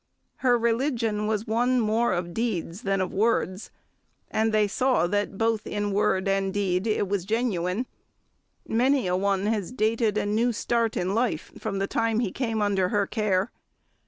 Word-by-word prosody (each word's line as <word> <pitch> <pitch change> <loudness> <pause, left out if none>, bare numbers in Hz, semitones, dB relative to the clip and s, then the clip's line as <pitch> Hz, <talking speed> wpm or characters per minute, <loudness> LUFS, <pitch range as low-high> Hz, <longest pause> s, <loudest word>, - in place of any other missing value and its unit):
Her 245 -2 +3
religion 230 -3 0
was 215 0 -1
one 245 +3 +2
more 225 +1 +1
of 175 0 -2
deeds 200 -4 -2
than 195 -4 0
of 185 - -3
words, 200 -2 0 0.6
and 220 +1 +1
they 215 -1 +3
saw 250 -3 +2
that 205 +1 -1
both 225 -1 0
in 205 0 -2
word 195 -1 +1
and 195 0 +1
deed 190 0 0
it 215 -2 +1
was 195 -2 -1
genuine. 210 -1 -1 0.8
Many 255 +2 +2
a 180 0 +1
one 195 +1 0
has 210 -3 -1
dated 220 -2 +1
a - - 0
new 225 +4 +1
start 230 0 0
in 185 +2 -1
life 225 -8 -1
from 210 -3 -3
the 195 - 0
time 225 +2 0
he 225 -6 -1
came 225 -3 -1
under 195 -3 +1
her 205 0 +1
care. 205 -1 0
210 Hz, 170 wpm, -26 LUFS, 195-230 Hz, 0.8 s, Her